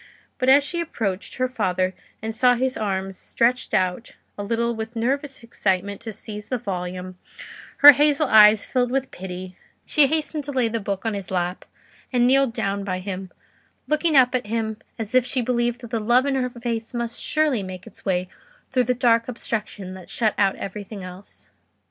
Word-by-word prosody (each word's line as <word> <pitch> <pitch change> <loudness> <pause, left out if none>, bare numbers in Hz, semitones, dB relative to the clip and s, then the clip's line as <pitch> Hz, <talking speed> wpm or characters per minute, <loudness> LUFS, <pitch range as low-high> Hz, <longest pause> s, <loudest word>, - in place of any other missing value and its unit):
But 255 -1 +2
as 280 +2 +7
she 340 +4 -2
approached 210 - -3
her 255 0 0
father 185 -6 -1 0.3
and 220 0 -3
saw 245 +2 +4
his 260 +1 0
arms 195 -3 -3
stretched 245 +2 0
out 185 +2 -1 0.2
a 205 - -5
little 235 +2 0
with 220 +1 -6
nervous 270 +3 -2
excitement 200 -3 -1
to 225 - -6
seize 210 0 -8
the 255 - 0
volume, 185 -2 -5 0.7
her 290 - +15
hazel 295 +1 +2
eyes 215 -2 +7
filled 250 -2 0
with 265 +1 -1
pity; 185 0 -8 0.3
she 295 -2 +4
hastened 310 0 -1
to 290 - -4
lay 255 -4 +1
the 230 0 -2
book 200 0 -4
on 225 - 0
his 200 -3 -5
lap, 180 0 -2 0.5
and 245 -2 +3
kneeled 270 0 +4
down 200 -4 -2
by 185 -2 -2
him, 185 0 -6 0.6
looking 305 +1 +1
up 255 -2 +6
at 250 -4 -1
him 220 -1 -2 0.2
as 225 -1 -5
if 255 -1 +5
she 250 +1 -2
believed 240 0 0
that 235 -2 -10
the 230 - 0
love 240 +4 +3
in 280 - 0
her 255 -1 0
face 235 -1 -4
must 235 0 -3
surely 305 -7 +1
make 185 -1 -8
its 225 - -11
way 185 -1 0 0.4
through 255 -2 +2
the 250 +2 +1
dark 230 -1 +3
obstruction 210 -5 -4
that 185 -2 -11
shut 220 -3 +1
out 195 -1 +2
everything 200 0 -7
else. 185 +2 -11
230 Hz, 190 wpm, -23 LUFS, 195-255 Hz, 0.7 s, her